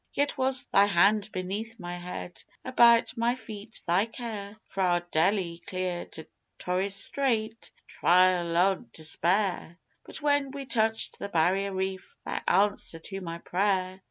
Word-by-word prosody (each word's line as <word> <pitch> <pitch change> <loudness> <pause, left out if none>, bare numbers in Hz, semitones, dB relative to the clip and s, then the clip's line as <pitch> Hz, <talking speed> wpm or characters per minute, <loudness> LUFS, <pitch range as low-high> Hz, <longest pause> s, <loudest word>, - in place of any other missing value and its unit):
Yet 285 0 0
was 260 0 +1
Thy 200 +1 +4
hand 205 +3 +3
beneath 210 +5 -5
my 175 -1 -6
head: 175 0 -8 0.2
about 235 -2 +5
my 235 +1 +1
feet 220 -3 -9
Thy 180 +5 +2
care 215 -3 -7
Fra' 180 -2 0
Deli 170 0 +1
clear 185 -1 -3
to 160 - -10 0.3
Torres 190 +2 -1
Strait, 225 -2 +1 0.2
the - - -33
trial 180 -1 +3
o' 190 +2 +4 0.2
despair, 175 +2 0 0.3
But - - -9
when 285 -2 +1
we 275 0 -7
touched 220 -3 0
the 200 - -5
Barrier 190 +3 +1
Reef 190 0 -4
Thy - - -3
answer 200 -3 +2
to 195 +4 -7
my 170 -2 -5
prayer! 185 +1 -1
195 Hz, 145 wpm, -28 LUFS, 180-225 Hz, 0.3 s, about